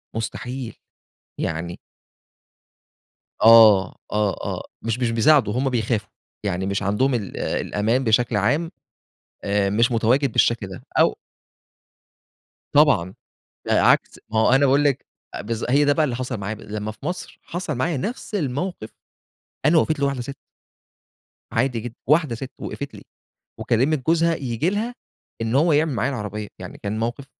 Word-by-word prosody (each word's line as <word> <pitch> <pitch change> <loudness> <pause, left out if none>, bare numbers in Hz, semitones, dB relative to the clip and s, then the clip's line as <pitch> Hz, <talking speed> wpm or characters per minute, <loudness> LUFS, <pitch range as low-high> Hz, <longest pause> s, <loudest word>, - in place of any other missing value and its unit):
مستحيل، 120 +2 -4 0.7
يعني 85 +2 -3 1.6
آه 110 -4 +7 0.2
،آه، 105 -2 +1
آه، - - -3 0.2
مش 115 +2 -2
مش 120 -2 +1
بيساعدوا، 115 -2 +4
هُم 130 +2 0
بيخافوا، 110 -4 -1 0.3
يعني 95 -1 -1
مش 100 +1 -1
عندهم 125 +7 +1
ال 105 -6 -3
الأمان 115 +6 0
بشكل 115 -1 +2
عام 155 - +1 0.7
آآ، 100 -1 +1
مش 115 +5 +2
متواجد 120 +4 +2
بالشكل 115 -4 +2
ده 95 - -10 0.2
أو - - +4 1.5
طبعًا، 140 - +4 0.6
عكس - - +3
ما 110 - 0
هو - - +4
أنا 135 +1 +5
باقول 140 +2 +3
لِك 140 -3 0 0.3
أ - - -4
بالض 115 +2 -3
هي 145 +2 +4
ده 145 - +4
بقى 155 +1 +2
اللي 125 -5 -2
حصل 125 -1 -3
معايا 100 +2 -4
ب 110 - -13
لمّا 105 0 -5
في 135 +7 -10
مصر 180 +1 -5
حصل 175 -3 -4
معايا 150 +6 -1
نَفس 215 - -5
الموقِف، 145 - -3 0.8
أنا 160 +2 +5
وقفت 155 -1 +2
لي 140 - +2
واحدة 135 -3 -1
سِت. 135 +3 -7 1.2
عادي 120 0 0
جدًا، 120 +1 -7 0.2
واحدة 150 -6 +3
سِت 130 +2 -7
وقفت 140 -1 -6
لي، - - -11 0.6
وكلمت 130 +3 +1
جوزها 165 0 +3
ييجي 135 +5 -1
لها 230 +4 -2 0.5
إن 115 +3 -1
هو 155 +2 +4
يعمِل 150 -1 +2
معايا 125 +3 0
العربية، 105 -3 -5
يعني - - -8
كان 105 +2 -2
موقِف 120 +4 -3
120 Hz, 150 wpm, -22 LUFS, 110-145 Hz, 1.6 s, آه